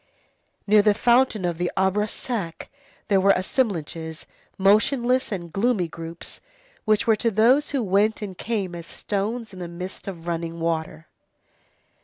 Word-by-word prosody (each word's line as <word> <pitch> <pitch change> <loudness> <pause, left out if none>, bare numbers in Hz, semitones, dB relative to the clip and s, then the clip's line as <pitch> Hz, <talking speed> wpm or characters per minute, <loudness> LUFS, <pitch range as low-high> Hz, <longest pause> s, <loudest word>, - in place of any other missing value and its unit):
Near 210 +1 +6
the 205 0 +3
fountain 240 -3 +3
of 170 -1 -2
the 175 0 0
Arbre 190 +2 +2
Sec, 205 -8 -5 0.4
there 195 -2 +3
were 200 +1 +6
"assemblages", 170 - -2 0.3
motionless 240 +6 +3
and 170 -5 -5
gloomy 200 -3 +1
groups 165 +1 -8 0.4
which 215 -1 +2
were 225 - +4
to 230 - +2
those 240 +7 +4
who 275 -4 0
went 210 +3 +2
and 195 -3 -6
came 195 -2 -3
as 170 -1 -8
stones 215 +2 -3
in 185 - -9
the 175 - -5
midst 180 +3 -8
of 170 -4 -7
running 170 0 -3
water. 165 -1 -2
195 Hz, 150 wpm, -24 LUFS, 170-220 Hz, 0.4 s, Near